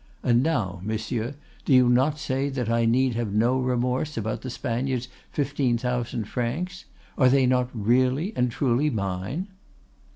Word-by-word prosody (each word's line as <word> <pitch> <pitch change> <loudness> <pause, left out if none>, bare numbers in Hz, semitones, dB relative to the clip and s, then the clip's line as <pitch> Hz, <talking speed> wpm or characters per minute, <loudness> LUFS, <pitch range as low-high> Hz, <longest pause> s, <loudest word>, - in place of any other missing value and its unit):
—And 120 0 +4
now, 110 - -1
monsieur, 110 +4 -3 0.3
do 130 -2 +5
not 130 +5 +3
you - - -15
say 135 -1 -1
that 125 -4 -2
I 115 0 +2
need 125 +2 +3
have 115 -3 -2
no 120 +5 +2
remorse 125 +3 -1
about 110 0 -2
the 130 - -5
Spaniard's 125 +1 -2 0.2
fifteen 140 -4 0
thousand 125 -1 -2
francs? 155 - -3 0.3
Are 130 -2 +6
they 135 0 +4
not 125 0 +2
really 130 - +1
and 125 0 +1
truly 135 +4 +1
mine? 105 - -3
125 Hz, 155 wpm, -25 LUFS, 115-135 Hz, 0.3 s, Are